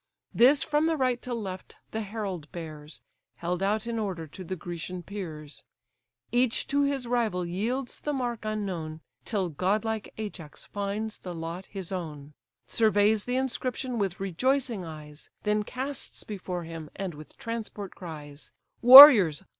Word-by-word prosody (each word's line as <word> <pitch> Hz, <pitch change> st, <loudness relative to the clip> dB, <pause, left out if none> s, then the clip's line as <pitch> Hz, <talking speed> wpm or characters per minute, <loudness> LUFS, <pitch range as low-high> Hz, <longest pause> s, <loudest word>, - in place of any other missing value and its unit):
This 270 Hz, +4 st, +5 dB
from 300 Hz, +3 st, +1 dB
the 325 Hz, -1 st, 0 dB
right 255 Hz, -3 st, 0 dB
to 250 Hz, -, -7 dB
left 195 Hz, -6 st, -6 dB, 0.2 s
the 220 Hz, -, -3 dB
herald 195 Hz, -7 st, -5 dB
bears, 155 Hz, -3 st, -9 dB, 0.3 s
Held 175 Hz, +1 st, -3 dB
out 210 Hz, +3 st, 0 dB
in 230 Hz, -1 st, -3 dB
order 190 Hz, -6 st, -3 dB
to 170 Hz, +5 st, -10 dB
the 185 Hz, +1 st, -5 dB
Grecian 175 Hz, +1 st, -6 dB
peers; 160 Hz, -7 st, -8 dB, 0.7 s
Each 245 Hz, 0 st, +2 dB
to 285 Hz, 0 st, +2 dB
his 280 Hz, -2 st, 0 dB
rival 230 Hz, -7 st, 0 dB
yields 235 Hz, +9 st, -3 dB
the 295 Hz, -, -3 dB
mark 245 Hz, -5 st, -3 dB
unknown, 185 Hz, -8 st, -4 dB, 0.2 s
Till 195 Hz, -5 st, -1 dB
godlike 210 Hz, +7 st, -1 dB
Ajax 195 Hz, -8 st, -7 dB
finds 205 Hz, +2 st, -4 dB
the 180 Hz, -2 st, -7 dB
lot 165 Hz, +3 st, -6 dB
his 195 Hz, -3 st, -7 dB
own; 150 Hz, -5 st, -6 dB, 0.3 s
Surveys 215 Hz, -1 st, +2 dB
the 245 Hz, -, -2 dB
inscription 255 Hz, -1 st, -2 dB
with 195 Hz, -1 st, -2 dB
rejoicing 235 Hz, +3 st, 0 dB
eyes, 155 Hz, -2 st, -10 dB
Then 210 Hz, 0 st, +1 dB
casts 260 Hz, +5 st, -4 dB
before 185 Hz, -4 st, -5 dB
him, 165 Hz, -2 st, -8 dB
and 190 Hz, -3 st, -4 dB
with 150 Hz, +1 st, -13 dB
transport 220 Hz, -4 st, -6 dB
cries: 150 Hz, -4 st, -9 dB, 0.3 s
"Warriors! 240 Hz, -, +11 dB
200 Hz, 145 wpm, -27 LUFS, 170-235 Hz, 0.7 s, Warriors